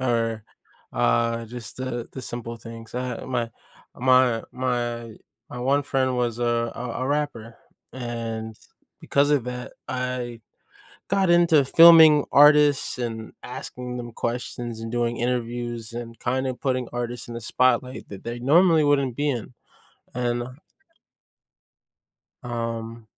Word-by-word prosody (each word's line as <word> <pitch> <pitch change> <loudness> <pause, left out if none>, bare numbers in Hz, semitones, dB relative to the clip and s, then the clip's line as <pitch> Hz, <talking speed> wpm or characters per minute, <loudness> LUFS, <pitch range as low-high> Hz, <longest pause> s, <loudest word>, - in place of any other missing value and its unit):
or, 115 -3 0 0.5
uh, 115 - +1
just 115 -1 -8
the 125 -2 -4
the 130 - -7
simple 120 -1 -5
things. 115 0 -11
Uh, 125 -1 -3
my 120 -3 -2 0.4
my 125 -2 +3
my 120 -2 -2 0.4
my 125 - -7
one 140 +3 +2
friend 130 -2 0
was 120 -2 -1
a 120 -1 0
a 125 -1 -5
a - - -1
rapper, 140 -6 -2 0.4
and 115 -3 -5 0.4
because 140 +1 +2
of 145 -5 +2
that, 125 0 -6 0.2
I 125 -2 -3 0.7
got 195 -2 +2
into 170 -4 +5
filming 160 -1 +8
artists 145 -2 +5
and 115 -2 -5
asking 125 0 -6
them 120 -1 -6
questions 120 -1 -4
and 115 0 -6
doing 120 -1 -1
interviews 120 -1 -3
and 115 -1 -7
kind 130 +2 -1
of 130 - -4
putting 130 -2 -1
artists 120 0 -4
in 120 - -7
the 115 - -6
spotlight 125 +2 +1
that 100 -2 -9
they 120 +1 -5
normally 160 +4 +5
wouldn't 140 -4 +2
be 145 +2 0
in, 125 -2 -4 0.6
and 120 0 -1 2.0
um 115 -1 -5
120 Hz, 130 wpm, -24 LUFS, 115-130 Hz, 2.0 s, filming